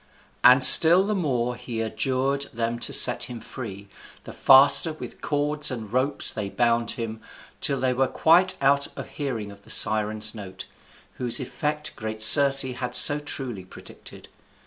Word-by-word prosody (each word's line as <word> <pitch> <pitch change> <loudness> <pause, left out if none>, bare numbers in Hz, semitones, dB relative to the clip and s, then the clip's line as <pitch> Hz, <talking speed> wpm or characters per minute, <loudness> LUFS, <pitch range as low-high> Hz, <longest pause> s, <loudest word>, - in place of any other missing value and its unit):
And 125 +2 +4
still 170 +7 +7
the 210 +2 -4
more 125 - -4
he 120 -2 -9
adjured 130 +5 -4
them 115 0 -6
to - - -3
set - - +2
him 120 -2 -11
free, 100 -6 -12 0.4
the - - -13
faster 140 +4 +4
with 155 - -13
cords 150 0 -1
and 115 -4 -9
ropes 135 +3 0
they 105 -2 -7
bound 120 +1 -2
him; 110 -2 -8 0.4
till 140 -1 -2
they 130 -1 -2
were 130 +1 -2
quite 175 +7 0
out 140 +1 0
of - - -10
hearing 115 -8 -8
of 100 0 -18
the - - -22
Sirens' 110 0 0
notes, 95 -3 -12 0.5
whose 125 +2 -2
effect 150 +3 -6
great 110 -1 -5
Circe 140 +3 +7
had 125 -1 -7
so 145 0 +7
truly 130 -8 -8
predicted. 95 - -15
125 Hz, 160 wpm, -21 LUFS, 110-140 Hz, 0.5 s, still